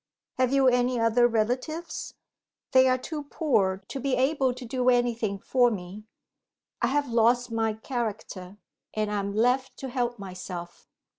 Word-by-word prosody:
"Have 255 -1 +3
you 270 -1 +4
any 245 0 +2
other 230 +1 +4
relatives?" 250 +9 -2 0.6
"They 260 -1 +6
are 255 0 +3
too 295 +3 -6
poor 200 - 0
to 275 - -4
be 265 0 0
able 265 0 +2
to 250 0 -8
do 255 +1 +1
anything 235 -4 +1
for 245 +4 +3
me. 200 0 -7 0.8
I - - +3
have 290 +1 0
lost 240 +1 +3
my 225 -1 0
character 215 -5 -5 0.4
and 215 -1 -1
I 205 - 0
am 200 0 -3
left 250 +4 +1
to 265 - -6
help 245 -1 -1
myself." 180 -3 -8
245 Hz, 155 wpm, -27 LUFS, 215-260 Hz, 0.8 s, They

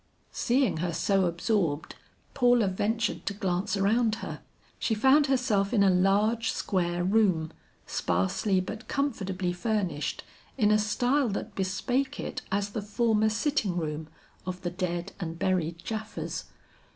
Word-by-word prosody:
Seeing 250 - +1
her 170 +1 -1
so 195 +2 +2
absorbed, 170 -3 0 0.4
Paula 245 -4 +4
ventured 215 +4 -1
to 200 - -1
glance 190 0 -1
around 220 +3 +2
her. - - -7 0.4
She 220 - +1
found 270 +6 +5
herself 245 -7 +1
in 200 - +5
a 195 - +5
large 205 +5 +2
square 175 -3 -1
room 185 -5 +2 0.3
sparsely 95 - 0
but 220 +5 -7
comfortably 190 -10 -1
furnished 185 -6 -2 0.3
in 210 -4 +4
a 215 - +5
style 245 +5 +1
that 205 +1 -4
bespake 245 +9 -1
it - - -4
as 200 +1 0
the 220 - -3
former 220 +1 +2
sitting 225 - 0
room 155 -1 -3 0.4
of 180 0 -6
the 175 - -2
dead 175 0 -3
and 165 -3 -4
buried 170 -3 0
Japhas. 220 -1 -4
200 Hz, 140 wpm, -28 LUFS, 180-225 Hz, 0.4 s, found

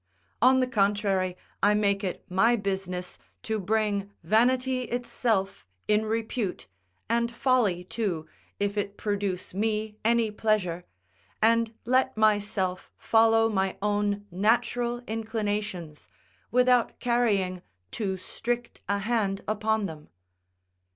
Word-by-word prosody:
On 260 +2 +6
the - - +3
contrary, 200 -5 +1 0.2
I 210 +1 +4
make 200 -1 +1
it 185 - -4
my 225 +6 +3
business 190 -4 -3 0.2
to 220 -1 -1
bring 205 0 0
vanity 255 +6 +2
itself 225 - -1 0.2
in 210 +1 +2
repute, 225 -2 -2 0.4
and 235 +1 +1
folly 235 -8 +2
too, 180 -5 -3 0.3
if 205 +1 0
it 200 0 -4
produce 200 -4 -2
me 215 +1 -1
any 230 -1 +2
pleasure; 195 -5 0 0.5
and 230 0 +3
let 260 0 +2
myself 205 -4 +1
follow 225 0 +4
my 190 -3 0
own 205 0 0
natural 240 +5 +1
inclinations, 210 -7 -3 0.4
without 250 -1 +3
carrying 205 -7 +1 0.3
too 195 -3 -2
strict 240 +5 -4
a 200 - +2
hand 200 -2 -1
upon 220 0 0
them. 155 -4 -8
210 Hz, 110 wpm, -27 LUFS, 195-230 Hz, 0.5 s, On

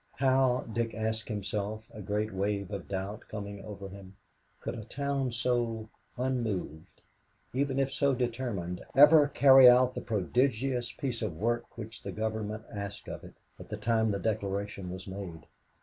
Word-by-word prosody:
How, 130 -1 +3
Dick 115 0 -3
asked 110 0 -2
himself, 105 +1 -3
a 105 - -8
great 105 +2 -1
wave 100 +1 -1
of 100 -3 -5
doubt 100 +2 -4
coming 100 -2 -6
over 100 -2 -7
him, 95 0 -11 0.4
could - - -4
a 115 - -6
town 140 +2 -2
so 115 -2 -1 0.3
unmoved, 115 - -3 0.5
even 135 0 0
if 135 0 +1
so 140 -1 +2
determined, 115 -8 -2
ever 145 +2 +8
carry 135 -2 +8
out 125 +1 +5
the - - -4
prodigious 120 +3 0
piece 125 -5 -4
of 95 -8 -3
work 120 +5 -1
which 115 0 -8
the - - -5
Government 110 0 -3
asked 100 -1 -6
of - - -6
it, - - -12 0.2
at - - -11
the 105 - -4
time 110 +1 +2
the 100 - 0
declaration 100 -2 -2
was 95 +1 -7
made? 95 -4 -7
110 Hz, 160 wpm, -30 LUFS, 100-125 Hz, 0.5 s, ever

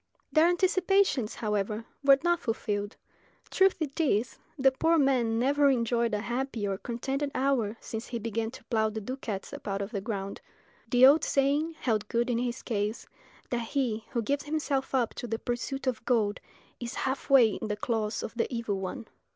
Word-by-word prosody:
Their 315 +1 +5
anticipations, 365 - +2
however, 210 +1 -2 0.2
were 275 -1 +7
not 345 0 +2
fulfilled. 205 -4 -3 0.5
True 385 0 +5
it 300 -2 -4
is, 250 -7 +1 0.2
the 270 -1 +5
poor 325 +5 +2
man 255 -6 +2
never 280 +4 +3
enjoyed 235 -3 +1
a 205 - -2
happy 240 -2 -2
or 195 -1 -2
contented 270 +4 -2
hour 245 -5 +1
since 225 0 -6
he 240 - -3
began 225 0 -2
to 250 - -12
plough 220 -2 +1
the 220 +1 -4
ducats 220 -3 -5
up - - -8
out 195 -1 -1
of 200 +1 -4
the 200 -4 -3
ground. 200 -2 -4 0.5
The 250 0 +7
old 285 +4 +7
saying 290 +4 +1
held 215 -4 0
good 240 +2 0
in 235 - +1
his 245 0 -3
case, 210 -1 -2 0.5
that 240 -1 0
he 235 -6 -1
who 235 -3 -1
gives 285 +6 -1
himself 290 -3 -1
up 245 -3 +1
to 245 - -6
the 225 0 -2
pursuit 245 +4 -3
of 250 -4 -1
gold 220 -4 +1 0.4
is 240 -1 -5
half 265 +2 -2
way 260 -5 +7
in 215 - -4
the 210 -1 -2
claws 220 -1 -1
of - - -5
the 235 +2 -1
evil 230 -5 -2
one. 190 +4 -5
240 Hz, 185 wpm, -29 LUFS, 220-275 Hz, 0.5 s, were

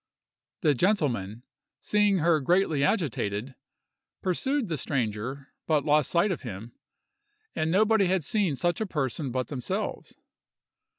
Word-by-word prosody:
The 155 -6 +4
gentleman, 125 - 0 0.4
seeing 210 -2 +2
her 165 -1 +3
greatly 160 -1 +2
agitated, 130 - -1 0.7
pursued 260 +8 0
the 160 -5 -2
stranger, 125 +1 -3
but 155 -3 +2
lost 150 -1 +3
sight 175 +4 +2
of 180 - -3
him, 115 -1 -7 0.8
and 155 - 0
nobody 210 +2 +3
had 185 -2 +1
seen 190 -2 0
such 175 - -1
a 220 - -1
person 140 -3 -2
but 130 0 -2
themselves. 130 -5 -4
155 Hz, 125 wpm, -27 LUFS, 130-185 Hz, 0.8 s, The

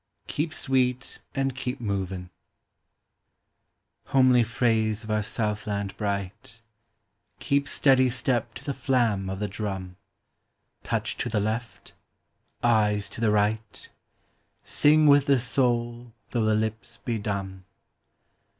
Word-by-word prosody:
"KEEP 155 +2 -2
SWEET 130 -3 -1
AND 135 -2 0
KEEP 130 -1 -4
MOVINV 95 -4 -3 1.8
Homely 130 -2 +5
phrase 110 -1 0
of 110 - -6
our 110 0 +1
southland 105 -2 -2
bright 105 +3 -5 0.4
— - - -47
Keep 140 0 +1
steady 130 -2 +4
step 120 -1 -1
to 125 - -9
the 140 - -2
flam 115 -9 0
of 95 - -4
the 105 +1 -2
drum; 95 -3 -5 0.8
Touch - - -2
to - - -2
the 105 - 0
left 110 +3 -4 0.4
— - - -42
eyes 105 -3 +2
to - - -8
the 115 - +3
right 105 0 -1 0.4
— - - -44
Sing 155 +1 +4
with 145 -1 +6
the 140 -1 +5
soul 120 -1 0 0.2
tho' 120 -2 0
the 110 0 +3
lips 110 +2 -3
be 115 -1 -3
dumb. 95 -2 -4
115 Hz, 130 wpm, -26 LUFS, 105-125 Hz, 1.8 s, with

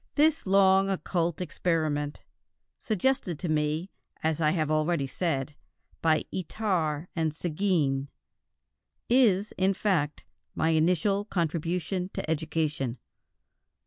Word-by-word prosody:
This 305 -4 +3
long, 195 0 +5
occult 175 -3 -1
experiment 155 -5 -1 0.6
suggested 215 - 0
to 175 - -4
me, 155 +3 0 0.3
as 160 0 0
I 155 - +4
have 155 -2 0
already 155 -1 +1
said, 140 -1 -2 0.5
by 160 -1 +2
Itard 175 -5 -1
and 160 -2 +1
Séguin 155 -4 0 1.0
is, 215 -5 +4
in 190 +1 +3
fact, 170 -8 0 0.3
my 160 - +1
initial 180 +5 +2
contribution 180 +1 -1
to - - -3
education. 155 -5 -1
165 Hz, 105 wpm, -28 LUFS, 155-190 Hz, 1.0 s, long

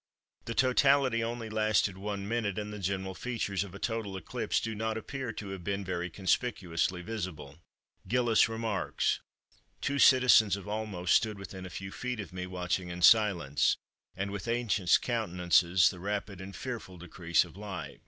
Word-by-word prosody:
The 115 - -4
totality 130 -1 +3
only 115 0 -4
lasted 110 -2 +1
one 100 0 -4
minute, 110 -4 -1
and 105 0 -4
the 105 - -6
general 95 0 -2
features 105 -3 -2
of 100 -2 -10
a - - -6
total 110 -3 -3
eclipse 90 - -2
do 115 - -3
not 110 +1 -2
appear 130 +1 -5
to 100 -2 -7
have 95 -2 -6
been 100 +2 -2
very 90 -1 -3
conspicuously 90 -3 -1
visible. 85 -8 -6 0.5
Gilliss 120 -2 +3
remarks:—"Two 115 +4 -3
citizens 125 -8 +6
of 100 - -8
Olmos 105 -4 -4
stood 110 -2 +3
within 95 -1 -8
a - - -10
few 95 +1 -7
feet 125 +1 -4
of 95 -4 -7
me, 90 0 -4
watching 90 0 -2
in 85 0 -5
silence, 90 -10 +4 0.4
and 95 +1 -3
with 100 0 -5
anxious 115 -6 +3
countenances, 90 -5 +2
the 90 - -10
rapid 100 0 -4
and 95 0 -8
fearful 115 -5 -6
decrease 85 0 0
of 85 - -15
light. 100 -3 -7
100 Hz, 165 wpm, -30 LUFS, 90-115 Hz, 0.5 s, citizens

